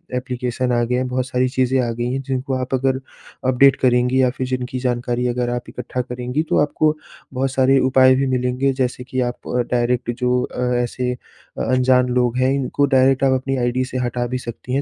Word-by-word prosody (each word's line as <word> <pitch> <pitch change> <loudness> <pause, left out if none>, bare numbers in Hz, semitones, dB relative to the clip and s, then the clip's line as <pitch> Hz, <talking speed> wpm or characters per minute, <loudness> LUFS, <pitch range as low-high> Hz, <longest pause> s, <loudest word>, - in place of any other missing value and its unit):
application 125 0 -2
आ 120 -1 +2
गए 120 +1 -1
हैं 130 +1 0
बहुत 125 0 -2
सारी 130 0 0
चीज़ें 130 0 +2
आ - - -1
गई 120 +2 -3
हैं 135 - -2
जिनको 135 +1 -2
आप 130 +1 -5
अगर 130 0 0 0.5
अपडेट 135 +2 +5
करेंगी 125 +1 +3
या 130 - +4
फ़िर 130 +1 -4
जिनकी 125 0 -3
जानकारी 125 -1 -1
अगर 120 0 -1
आप 120 0 -4
इकट्ठा 125 +1 -4
करेंगी 125 +4 -3
तो - - +2
आपको 155 +1 +1 0.4
बहुत 130 +1 -1
सारे 130 +1 +3
उपाय 130 0 +5
भी 135 +1 0
मिलेंगे 130 +1 0
जैसे 125 -1 -1
कि 130 +1 -4
आप 120 - -7 0.2
डायरेक्ट 120 0 0
जो 125 0 +1
अ, 125 0 -2
ऐसे 125 +1 -1
अ 125 - -10
अनजान 130 0 +3
लोग 125 0 +1
हैं 130 +1 +2
इनको 140 +1 0
डायरेक्ट 135 0 +3
आप 135 - +4
अपनी 135 +1 -1
आई 120 -1 +1
डी 130 +1 0
से 130 - -5
हटा 120 -1 -1
भी 125 +1 -2
सकती 125 +1 -7
हैं 140 - +1
125 Hz, 210 wpm, -20 LUFS, 125-130 Hz, 0.5 s, अपडेट